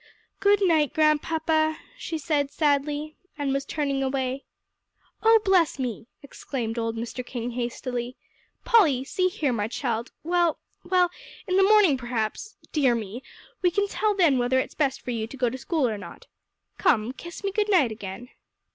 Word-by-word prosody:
"Good 405 0 +4
night, 310 -4 +2
Grandpapa," 315 +1 +2 0.2
she 335 -9 -4
said 295 -3 0
sadly, 295 +1 0 0.2
and 280 -2 -1
was 275 0 -1
turning 280 -3 -1
away. 265 0 -2 0.8
"Oh 450 0 +6
bless 365 -7 +3
me!" 240 -4 -4 0.2
exclaimed 240 -4 -4
old 225 0 -2
Mr. 240 +2 -5
King 245 -1 -5
hastily, 245 0 -4 0.5
"Polly, 315 - +4
see 365 +7 0
here, 300 -7 -1
my 210 -2 -1
child, 235 -1 -3
well 345 -1 +2 0.3
well, 360 -1 +2 0.3
in 370 - -1
the 385 - +5
morning 390 -7 +5
perhaps 240 - -3
dear 270 -6 +3
me! 225 +2 -5 0.4
we 360 - +4
can 405 +3 0
tell 420 +1 0
then 325 -9 +4
whether 245 +2 +2
it's - - -3
best 275 -4 0
for 250 - -4
you 225 -2 -2
to 275 - -10
go 250 -2 +1
to 260 - -5
school 300 0 0
or 215 -3 -3
not. 175 -4 -11 0.5
Come, 225 -2 +2
kiss 345 +7 -10
me 395 - -1
good 420 +1 0
night, 315 - +4
again." 215 +3 -7
280 Hz, 165 wpm, -25 LUFS, 245-335 Hz, 0.8 s, Oh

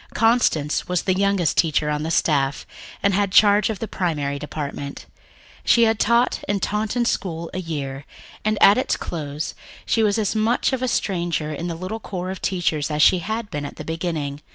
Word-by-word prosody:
Constance 225 -11 +2
was 180 0 0
the 185 - +2
youngest 195 -3 +1
teacher 155 -2 +2
on 150 0 -1
the 160 - -3
staff, 145 -4 +1 0.4
and 200 - +3
had 200 0 +1
charge 205 +1 +5
of 220 - -2
the 225 - -5
Primary 145 -8 -2
Department. 145 -1 -6 0.6
She 235 - +5
had 225 -1 +2
taught 235 +3 +2
in 205 0 0
Taunton 215 +5 -1
school 170 -6 -2
a 185 - -3
year, 145 -5 -5 0.4
and 215 0 +1
at 200 +5 +7
its 260 - 0
close 150 -2 -4 0.3
she 225 - +1
was 210 -1 +2
as 215 -1 0
much 225 +5 +1
of 260 - -1
a 255 - 0
stranger 170 -8 -1
in 170 +4 -4
the 170 - -3
little 185 +6 -5
corps 185 -3 -5
of 190 - -7
teachers 160 -5 0
as 150 -1 +2
she 185 - +5
had 215 +4 -4
been 145 -1 -3
at 145 - -7
the - - -8
beginning. 160 -4 -3
180 Hz, 195 wpm, -22 LUFS, 150-210 Hz, 0.6 s, at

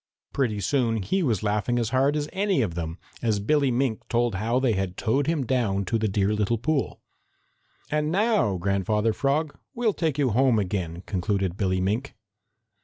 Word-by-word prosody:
Pretty 115 -7 0
soon 115 -2 +1
he 190 - 0
was 115 - 0
laughing 105 +3 0
as 115 -1 -1
hard 135 +3 +2
as 150 -1 -1
any 195 - +1
of 95 -6 -2
them, 85 0 -4 0.2
as 110 -4 +1
Billy 140 +6 +2
Mink 125 -2 0
told 120 -1 +1
how 115 +6 0
they 130 -3 +2
had 95 -2 -2
towed 135 +6 +1
him 160 -5 0
down 110 -7 0
to 115 +5 0
the 110 - +1
dear 100 +1 +1
little 105 +2 +1
pool. 145 +4 -1 0.9
"And 150 0 0
now, 200 - +2
Grandfather 100 +4 0
Frog, 140 +4 0 0.2
we'll 235 -3 +1
take 160 -6 -1
you 135 -4 +2
home 125 +1 +3
again," 90 -3 -2
concluded 95 -2 -1
Billy 95 -2 0
Mink. 110 +9 -1
115 Hz, 180 wpm, -25 LUFS, 100-140 Hz, 0.9 s, home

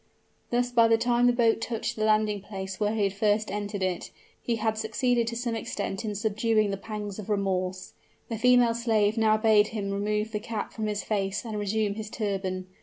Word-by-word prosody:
Thus 245 0 0
by 230 -2 +5
the 225 0 +4
time 240 +1 +3
the - - +6
boat 230 -2 +2
touched 225 -1 -3
the 215 - 0
landing 215 -1 +2
place 190 -1 -6
where 210 +1 +1
he 215 - +1
had 195 -1 +1
first 210 +1 +1
entered 205 -1 -3
it, 185 -2 -2 0.3
he 235 - -1
had 220 0 0
succeeded 230 +2 0
to 235 - -3
some 235 0 -2
extent 205 -2 -3
in 210 -2 -3
subduing 215 0 +1
the - - -1
pangs 210 -1 -6
of 210 - -8
remorse. 185 -2 -1 0.3
The 225 -2 -4
female 245 -1 +5
slave 220 -3 +1
now 220 -1 +3
bade 215 -1 +4
him 205 -3 -4
remove 210 +2 -1
the 210 - -2
cap 225 0 -5
from 220 -1 -3
his 210 -1 -2
face 200 0 -1
and 215 -2 -4
resume 205 0 0
his 215 0 -6
turban. 190 -4 -3
215 Hz, 205 wpm, -27 LUFS, 205-225 Hz, 0.3 s, the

